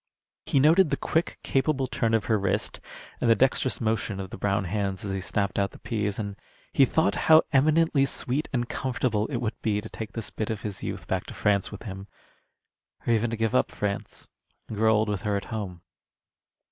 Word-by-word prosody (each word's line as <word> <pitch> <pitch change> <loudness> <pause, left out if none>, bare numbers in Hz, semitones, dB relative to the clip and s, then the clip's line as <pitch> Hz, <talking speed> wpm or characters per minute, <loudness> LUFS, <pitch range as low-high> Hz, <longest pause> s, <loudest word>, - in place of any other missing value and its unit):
He 140 - +3
noted 160 +5 +5
the 140 - 0
quick, 160 +2 -1
capable 135 0 +1
turn 115 -3 0
of 110 - 0
her 110 -2 +2
wrist 95 -1 -1 0.4
and 120 - +2
the 115 - +7
dexterous 130 0 +2
motion 110 -3 -1
of 95 -1 -6
the - - -6
brown 100 0 +1
hands 95 0 -2
as 100 - -2
they 95 0 -2
snapped 100 +1 -1
out 100 0 +1
the - - -14
pease, 105 -3 -2
and 100 -2 -4 0.4
he 135 - +6
thought 160 +5 +2 0.2
how 160 0 +9
eminently 150 0 +4
sweet 135 +2 -2
and 120 -3 -1
comfortable 120 -5 -1
it 135 - -2
would 120 -1 -3
be 105 -2 +1
to - - -8
take 110 -2 -7
this 115 - -5
bit 110 - -3
of 110 -2 -3
his 105 -3 -5
youth - - -5
back - - -2
to - - -8
France 100 -2 +1
with 105 - -8
him, 95 -2 -7 1.0
or 120 - +3
even 115 +1 +2
to 115 - -3
give 115 +1 0
up 130 - +3
France 100 -1 -4 0.4
and 110 - -6
grow 110 +1 +4
old 110 +1 +2
with 105 -3 -2
her 105 -1 0
at 100 - -5
home. 95 -5 -5
110 Hz, 210 wpm, -27 LUFS, 100-130 Hz, 1.0 s, how